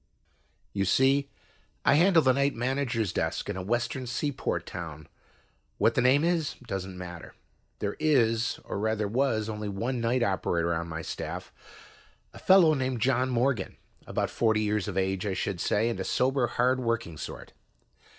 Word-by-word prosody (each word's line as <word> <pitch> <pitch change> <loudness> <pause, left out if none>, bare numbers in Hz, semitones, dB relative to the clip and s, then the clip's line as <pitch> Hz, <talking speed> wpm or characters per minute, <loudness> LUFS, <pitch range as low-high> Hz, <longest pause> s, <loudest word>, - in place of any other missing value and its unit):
You 100 - 0
see, 135 +7 +3 0.6
I - - +6
handle 170 +1 +5
the 130 -1 +4
night 140 +2 +1
manager's 120 -5 -1
desk - - -2
in - - -5
a 95 - -4
western 120 +5 -2
seaport 145 +3 -2
town; 80 -3 -7 0.7
what - - +3
the - - +2
name 130 +4 +4
is, 165 -3 0
doesn't 95 -3 -5
matter. 90 -2 -9 0.4
There 105 -1 -3
is, 115 -7 +2
or - - -4
rather 110 0 0
was, 110 -1 0
only 105 -1 -4
one 115 +5 -2
night 120 +2 +1
operator 85 -4 0
on 85 +1 -3
my 80 0 -5
staff, - - -6 0.8
a - - -11
fellow 185 -4 +6
named 130 -3 -1
John 130 +2 +2
Morgan, 125 -4 0 0.3
about - - -1
forty 110 -2 +2
years 105 -2 0
of - - -4
age, 95 -1 0
I 95 - -1
should 95 -3 -2
say, 110 +4 +1
and 120 - -2
a - - -1
sober, 130 -1 +1
hard 125 +2 +1
working 115 -8 -2
sort. - - -8
115 Hz, 165 wpm, -28 LUFS, 100-130 Hz, 0.8 s, I